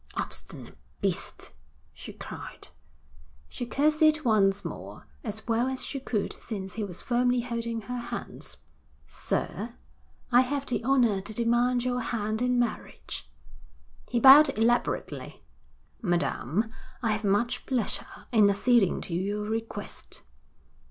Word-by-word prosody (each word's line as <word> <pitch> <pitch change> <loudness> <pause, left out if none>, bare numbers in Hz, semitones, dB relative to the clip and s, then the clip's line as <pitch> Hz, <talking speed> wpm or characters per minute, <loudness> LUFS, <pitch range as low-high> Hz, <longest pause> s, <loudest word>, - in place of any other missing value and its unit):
'Obstinate - - -5 0.2
beast,' - - -2 0.4
she 80 +1 -9
cried. - - -9 0.8
She 245 - -5
curtsied 310 +3 +3
once 200 -3 +3
more, - - -7 0.2
as 215 0 -4
well 235 +2 +2
as 260 0 -2
she 275 - -3
could 225 -5 -2
since 195 -4 -5
he 220 - -3
was 185 -4 -6
firmly 245 0 +2
holding 235 -1 -3
her 245 +4 -4
hands. 235 - -6 0.5
'Sir, 230 +3 -3 0.6
I 245 +1 +7
have 275 +2 -1
the 245 - -2
honour 240 -6 +3
to 210 +3 -6
demand 240 +1 +2
your 250 0 0
hand 220 -2 -2
in 250 0 +2
marriage.' 240 -2 -3 0.8
He 240 - +1
bowed 275 +4 +9
elaborately. 235 +2 0 0.6
'Madam, 175 - 0 0.3
I 225 - +2
have 215 +1 -1
much 205 +4 +1
pleasure 250 -6 -3
in 215 -4 +6
acceding 205 0 +3
to 170 - -6
your 200 +4 -1
request.' 225 +1 -5
235 Hz, 125 wpm, -28 LUFS, 210-250 Hz, 0.8 s, bowed